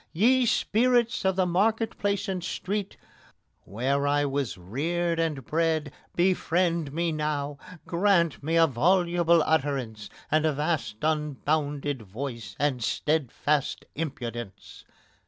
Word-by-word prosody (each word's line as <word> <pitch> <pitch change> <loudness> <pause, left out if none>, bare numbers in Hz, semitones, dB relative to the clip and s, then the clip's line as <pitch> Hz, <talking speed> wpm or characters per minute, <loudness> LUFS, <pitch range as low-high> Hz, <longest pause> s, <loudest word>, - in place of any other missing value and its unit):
Ye 245 +7 +4
spirits 240 0 +2
of 190 -1 +2
the 185 -1 +2
market 215 +6 +1
place 200 -1 0
and 185 -3 -3
street, 200 +2 -3 0.7
Where 135 +7 0
I 145 0 +2
was 140 -5 -2
reared 165 - -1
and 155 -6 -1
bred 160 -2 0 0.2
befriend 170 -3 +1
me 165 +3 0
now! 150 -2 -2 0.3
Grant 170 -3 +2
me 160 +3 -1
a 165 0 +6
voluble 170 +3 +3
utterance, 135 -9 -1 0.2
and 155 0 +3
a 155 -1 +2
vast 150 -6 -1
Unbounded 150 -2 -1
voice, 110 -1 -6
and 135 -4 0
steadfast 150 +1 0
impudence! 120 - -6
155 Hz, 120 wpm, -27 LUFS, 140-175 Hz, 0.7 s, a